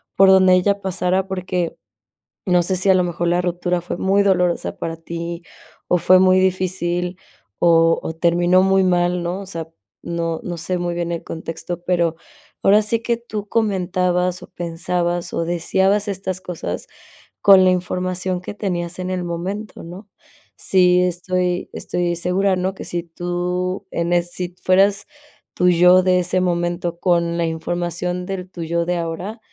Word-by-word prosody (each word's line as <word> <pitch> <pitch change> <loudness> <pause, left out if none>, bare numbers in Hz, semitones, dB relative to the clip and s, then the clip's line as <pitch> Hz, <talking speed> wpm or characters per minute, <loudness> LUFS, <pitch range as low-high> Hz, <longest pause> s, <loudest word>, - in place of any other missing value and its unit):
por 195 0 +6
donde 185 -1 +6
ella 200 +2 +2
pasara", 185 0 0
porque, 185 -2 -3 0.7
no 180 -2 +3
sé, 185 +2 0
si 185 +2 +2
a - - +6
lo 185 - +3
mejor 175 -1 -2
la 175 +1 +2
ruptura 175 0 -1
fue 175 - -5
muy 195 +1 +2
dolorosa 180 -3 +1
para 165 0 -4
tí, 170 +1 -6 0.5
o 180 - +3
fue 185 +2 +5
muy 185 0 +5
difícil, 185 -1 0 0.4
o 165 -1 +4
o 160 - -4
terminó 175 +2 +3
muy 195 0 +3
mal, 175 -1 +1
¿no?, 175 +3 -3
o 200 - -8
sea, 165 -4 -6 0.3
no 170 -1 -3
no 175 -1 -5
sé, 180 +3 -2
muy 175 0 -2
bien 170 0 -2
el 170 - -4
contexto, 165 +2 -6
pero, 170 -3 +1 0.5
ahora 205 +2 +5
sí 225 +2 0
que, 235 0 0
tú 215 -3 -6
comentabas 180 -4 0
o - - -9
pensabas 175 0 -2
o 165 - 0
deseabas 190 +4 +1
estas 190 -1 -3
cosas, 160 - -5 0.6
con 195 -2 +7
la 185 - +5
información 185 0 -2
que 180 - -7
tenías 175 -4 -3
en 185 - -3
el 185 -1 -2
momento, 190 +5 -5
¿no?, 180 +5 -10 0.5
sí, 180 -1 +3
estoy 180 0 -1
estoy 175 -1 -2
segura, 185 +3 +1
¿no?, 185 +1 -1
que - - -8
si 175 -1 -3
tú, 175 +2 -3
en 170 +1 -1
es 175 0 +1
si 180 0 -5
fueras 195 +2 +3 0.5
tú 180 0 +4
yo, 180 +1 +6
de 185 0 +3
ese 180 +1 0
momento, 175 -1 -1
con 170 -2 +1
la 170 - +1
información 175 +2 -3
del 185 -1 -5
tú 175 -2 -6
yo 170 +1 0
de 180 0 -1
ahora, 175 +7 -4
180 Hz, 170 wpm, -20 LUFS, 175-185 Hz, 0.7 s, con